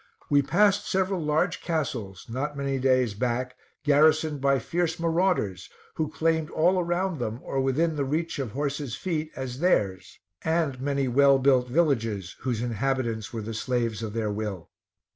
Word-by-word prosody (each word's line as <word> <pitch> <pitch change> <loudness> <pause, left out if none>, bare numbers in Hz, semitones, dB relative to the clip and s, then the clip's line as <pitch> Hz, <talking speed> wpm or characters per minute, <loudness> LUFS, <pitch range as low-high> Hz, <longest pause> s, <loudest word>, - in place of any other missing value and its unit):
We 145 0 +6
passed 205 +7 +2
several 190 -1 0
large 155 +3 0
castles, 125 - -3
not 140 +5 -3
many 140 -1 -1
days 130 -4 +2
back 125 +3 -2 0.3
garrisoned 155 0 +3
by 140 0 +3
fierce 165 +6 -1
marauders, 165 - 0 0.2
who 155 -2 -2
claimed 160 0 0
all 180 +4 +2
around 175 -1 -1
them, 115 -1 -3
or 135 - -1
within 155 +5 +1
the 140 - +1
reach 155 +3 -2
of 135 - -1
their 110 - -12
horses' 140 -3 -2
feet, 155 -4 -3
as 130 -1 -5
theirs; 105 - 0 0.3
and 160 -5 0
many 140 -1 0
well 140 +2 +5
built 130 -2 +3
villages, 115 - 0
whose 120 -3 -2
inhabitants 120 -2 -1
were 115 -2 -4
the 115 +2 -5
slaves 115 -1 -1
of 110 -2 -4
their 110 -2 -1
will. 100 -4 -5
140 Hz, 160 wpm, -26 LUFS, 120-160 Hz, 0.3 s, We